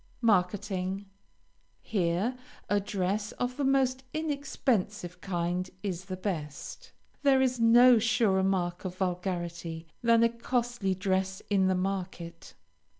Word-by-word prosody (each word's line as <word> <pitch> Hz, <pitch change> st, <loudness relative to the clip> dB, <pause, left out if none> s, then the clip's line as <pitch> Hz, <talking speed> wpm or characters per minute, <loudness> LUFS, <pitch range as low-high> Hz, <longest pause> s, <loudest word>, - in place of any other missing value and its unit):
MARKETING 190 Hz, -2 st, +1 dB, 0.8 s
Here 195 Hz, +4 st, 0 dB, 0.3 s
a 205 Hz, -, +2 dB
dress 200 Hz, +1 st, -2 dB
of 245 Hz, 0 st, -3 dB
the 285 Hz, -, -1 dB
most 265 Hz, -1 st, +2 dB
inexpensive 245 Hz, -, -1 dB
kind 180 Hz, 0 st, -2 dB
is 185 Hz, -3 st, -3 dB
the 185 Hz, -1 st, -5 dB
best. 160 Hz, -7 st, -5 dB, 0.3 s
There 275 Hz, -2 st, +5 dB
is 255 Hz, -2 st, +1 dB
no 240 Hz, +1 st, +7 dB
surer 225 Hz, -4 st, +2 dB
mark 180 Hz, -2 st, 0 dB
of 185 Hz, -2 st, -5 dB
vulgarity, 175 Hz, -3 st, -3 dB, 0.2 s
than 230 Hz, -1 st, +5 dB
a 230 Hz, -, +5 dB
costly 235 Hz, -4 st, -1 dB
dress 190 Hz, 0 st, -1 dB
in 190 Hz, -2 st, +4 dB
the 190 Hz, -, +2 dB
market. 180 Hz, -3 st, -4 dB
195 Hz, 120 wpm, -29 LUFS, 180-235 Hz, 0.8 s, no